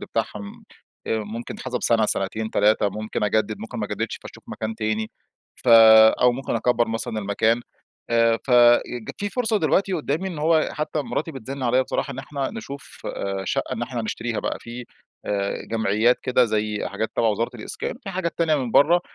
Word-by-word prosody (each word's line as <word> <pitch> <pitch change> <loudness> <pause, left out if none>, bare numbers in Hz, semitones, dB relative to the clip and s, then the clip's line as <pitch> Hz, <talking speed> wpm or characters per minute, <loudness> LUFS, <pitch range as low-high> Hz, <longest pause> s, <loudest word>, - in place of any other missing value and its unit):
بتاعهم 100 -1 -5 0.4
آآ 110 - 0
ممكن 110 +2 -6
يتحسب 125 -1 -4
سنة، 110 -2 +3
سنتين، 110 +3 -2
3، 105 0 +3
ممكن 105 +1 -3
أجدد، 110 0 0
ممكن - - -7
ما - - -2
أجددش، - - -3
فاشوف - - -12
مكان 110 0 -4
تاني، 110 0 -2 0.5
فأو 115 +1 +7
ممكن 135 +2 -4
أكبر 120 -2 +1
مثلًا 115 -1 -3
المكان، 110 +3 +1 0.5
آآ 115 -1 +3
فج 120 -2 +4
في 205 - -2
فرصة 225 -2 0
دلوقتي 195 -1 +1
قدامي 165 +3 -1
إنه 155 -4 -6
هو 160 -1 +3
حتى 150 0 -2
مراتي 160 +3 -3
بتزن 135 +1 -7
عليَّ 125 +1 +3
بصراحة، 140 - -3
إن 130 - -9
إحنا 135 0 -4
نشوف 140 -11 -9 0.4
شقة - - -2
إن - - -3
إحنا 120 -3 -3
نشتريها 115 +1 -3
بقى، - - -2
في 120 +1 -8 0.9
جمعيات 110 +2 +2
كده 125 0 +3
زي 105 -2 -1
حاجات 105 +2 -3
تبع 115 - +2
وزارة 110 +2 0
الإسكان، 105 - -5
في 195 - -4
حاجات 180 -3 -3
تانية 165 -2 +3
من 125 -4 -2
برّه 165 +8 +5
120 Hz, 170 wpm, -23 LUFS, 110-140 Hz, 0.9 s, فأو